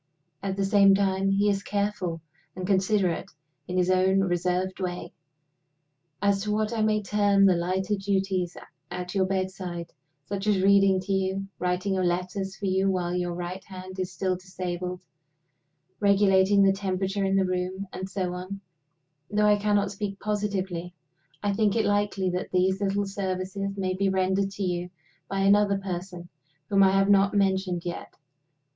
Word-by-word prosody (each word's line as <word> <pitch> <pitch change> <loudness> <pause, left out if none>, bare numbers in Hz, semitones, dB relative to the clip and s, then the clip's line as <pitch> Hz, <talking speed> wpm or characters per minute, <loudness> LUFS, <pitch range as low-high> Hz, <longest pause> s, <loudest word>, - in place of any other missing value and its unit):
At 195 -1 -3
the 195 - +1
same 195 -1 +6
time 195 0 +1
he 200 +1 +2
is 200 -1 +1
careful 200 -5 -2 0.3
and 185 0 -4
considerate, 190 -2 +1 0.4
in 180 - -3
his 180 0 +3
own 190 +1 +3
reserved 180 0 -1
way. 180 -1 -4 1.1
As 200 -1 +2
to 210 +1 -2
what 215 +1 0
I 225 - -1
may 215 -1 +2
term 205 -1 +3
the 190 - +6
lighter 185 +4 -1
duties 190 -2 -1 0.3
at 180 0 -5
your 190 -2 +2
bedside 185 -3 -3 0.3
such 200 +3 -4
as 205 -2 +3
reading 195 -1 +5
to 195 +1 -2
you, 190 0 -1
writing 180 +2 0
your 190 -1 0
letters 185 +2 -2
for 200 - -6
you 190 +1 +2
while 180 -2 -1
your 175 -1 -2
right 180 +2 -5
hand 185 0 -9
is 185 0 -2
still 185 0 -1
disabled, 180 -1 -5 1.0
regulating 200 -1 +4
the 195 0 +5
temperature 195 0 -2
in 195 0 +1
the 195 -1 +3
room, 185 +1 -2
and 190 +1 -5
so 185 -3 -2
on 185 +2 -6 0.7
though 210 0 +2
I 210 0 +6
cannot 205 -1 +1
speak 200 -1 -5
positively, 195 -4 -2 0.5
I 205 -1 +1
think 205 0 +2
it 225 - +2
likely 205 -2 +1
that 180 +1 -3
these 190 +2 +1
little 200 0 0
services 195 0 -3
may 185 -1 -1
be 195 +1 +1
rendered 190 +1 +1
to 200 0 -5
you 180 -1 -2 0.4
by 195 0 -1
another 200 0 +4
person 180 -2 -6 0.4
whom 195 -1 +4
I 195 - +7
have 195 0 +3
not 200 0 +4
mentioned 190 -3 +1
yet. 175 - -6
190 Hz, 165 wpm, -26 LUFS, 185-200 Hz, 1.1 s, I